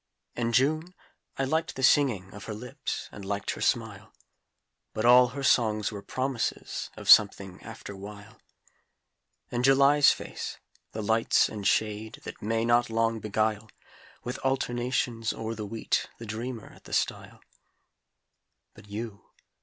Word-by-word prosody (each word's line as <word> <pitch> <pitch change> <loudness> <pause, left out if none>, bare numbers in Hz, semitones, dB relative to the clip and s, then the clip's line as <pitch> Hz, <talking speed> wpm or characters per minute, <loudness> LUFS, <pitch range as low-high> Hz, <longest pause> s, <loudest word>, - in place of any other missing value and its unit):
And 120 -1 -1
June 155 +7 +1 0.4
I 135 - 0
liked 160 +5 -1
the 130 - -5
singing 120 -10 +3
Of 105 0 -9
her 110 - -5
lips, 125 +4 -5
and 100 - -10
liked 100 +1 -2
her - - -7
smile - - -1 0.8
But 110 - -2
all 125 +1 +8
her 140 +3 -6
songs 110 -5 +2
were 100 -2 -7
promises 130 +2 -3
Of - - -9
something, 95 -2 +5
after 105 -2 -9
while; 100 +2 -11 1.1
And 120 0 -1
July's 140 +2 +6
face - - -6 0.3
the 110 - -5
lights 110 +2 +3
and 105 -2 -3
shade 110 0 0
That - - -9
may 115 +2 0
not 120 0 +3
long 115 0 +1
beguile, 110 0 -1 0.5
With 125 - -5
alternations 120 -3 -1
o'er 110 0 -4
the 105 -2 -6
wheat 115 +1 -1
The 115 - -9
dreamer 115 +1 -6
at - - -19
the - - -9
stile. - - -2 1.3
But - - -16
you! 105 0 -6
115 Hz, 145 wpm, -28 LUFS, 105-125 Hz, 1.3 s, all